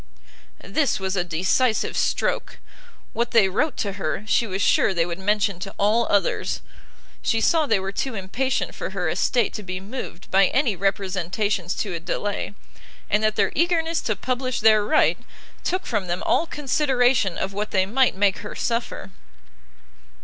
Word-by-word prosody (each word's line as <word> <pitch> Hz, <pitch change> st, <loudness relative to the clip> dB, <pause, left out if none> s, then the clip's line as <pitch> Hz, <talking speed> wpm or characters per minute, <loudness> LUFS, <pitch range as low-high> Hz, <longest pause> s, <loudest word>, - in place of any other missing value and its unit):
This 265 Hz, +3 st, +1 dB
was 190 Hz, 0 st, -2 dB
a 180 Hz, -, +1 dB
decisive 185 Hz, +8 st, +1 dB
stroke; -, -, -1 dB, 0.6 s
what 235 Hz, +1 st, 0 dB
they 220 Hz, -5 st, +5 dB
wrote 265 Hz, +11 st, 0 dB
to 200 Hz, -, -1 dB
her, 200 Hz, -, -2 dB
she 230 Hz, +1 st, +2 dB
was 190 Hz, -1 st, -3 dB
sure 195 Hz, -, +3 dB
they 165 Hz, -1 st, +2 dB
would 170 Hz, +1 st, -5 dB
mention 200 Hz, -1 st, +1 dB
to 195 Hz, +1 st, -7 dB
all 215 Hz, +4 st, +2 dB
others; 200 Hz, -3 st, 0 dB, 0.6 s
she 225 Hz, -, +1 dB
saw 315 Hz, +6 st, +3 dB
they 220 Hz, -6 st, +3 dB
were 190 Hz, +1 st, -4 dB
too 255 Hz, +4 st, -3 dB
impatient 245 Hz, +7 st, -2 dB
for -, -, -5 dB
her -, -, -2 dB
estate 240 Hz, -5 st, +1 dB
to -, -, -5 dB
be 185 Hz, -2 st, -5 dB
moved 195 Hz, -3 st, -8 dB
by 195 Hz, 0 st, +5 dB
any 255 Hz, -7 st, +1 dB
representations 195 Hz, 0 st, -1 dB
to 200 Hz, -4 st, -3 dB
a 170 Hz, -, -3 dB
delay, 205 Hz, +4 st, -3 dB, 0.6 s
and 210 Hz, -, +3 dB
that 215 Hz, 0 st, +2 dB
their -, -, +2 dB
eagerness 335 Hz, 0 st, +1 dB
to 215 Hz, -, -1 dB
publish 255 Hz, +2 st, -2 dB
their 215 Hz, -1 st, +5 dB
right, 305 Hz, +9 st, +3 dB, 0.4 s
took 370 Hz, +1 st, -1 dB
from 210 Hz, -6 st, -2 dB
them 175 Hz, +1 st, -2 dB
all 330 Hz, -, +2 dB
consideration 255 Hz, -, +1 dB
of 195 Hz, +1 st, -3 dB
what 210 Hz, +2 st, -3 dB
they 190 Hz, -1 st, +2 dB
might 250 Hz, +4 st, +2 dB
make 200 Hz, -1 st, +2 dB
her -, -, -7 dB
suffer. 235 Hz, -4 st, -3 dB
210 Hz, 170 wpm, -23 LUFS, 190-245 Hz, 0.6 s, they